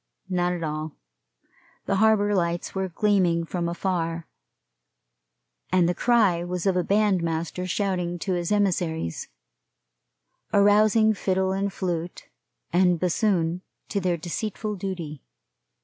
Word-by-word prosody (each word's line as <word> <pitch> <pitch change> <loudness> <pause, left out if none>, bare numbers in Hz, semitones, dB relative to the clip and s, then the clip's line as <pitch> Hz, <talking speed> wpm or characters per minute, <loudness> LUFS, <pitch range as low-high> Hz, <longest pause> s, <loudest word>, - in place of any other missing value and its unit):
Not 180 -1 +1
at 175 -2 -4
all. 155 0 -4 0.9
The 195 - 0
harbor 210 -1 +3
lights 170 -2 -1
were 190 -1 -2
gleaming 180 -3 +2
from 170 0 -2
afar; 170 -2 -2 1.5
and 180 -2 +4
the 175 - +1
cry 205 -5 +3
was 180 0 -4
of 195 - +3
the 180 0 +1
bandmaster 180 -3 0
shouting 180 -3 -1
to 185 +2 -2
his 175 0 -2
emissaries, 175 - 0 1.2
arousing 215 +2 +4
fiddle 190 -2 0
and 195 +1 -1
flute 175 -2 -4 0.4
and 180 -1 +3
bassoon 180 -2 +1 0.3
to 200 - -1
their 180 -2 0
deceitful 210 +5 -4
duty. 175 -7 -5
180 Hz, 115 wpm, -25 LUFS, 170-200 Hz, 1.5 s, and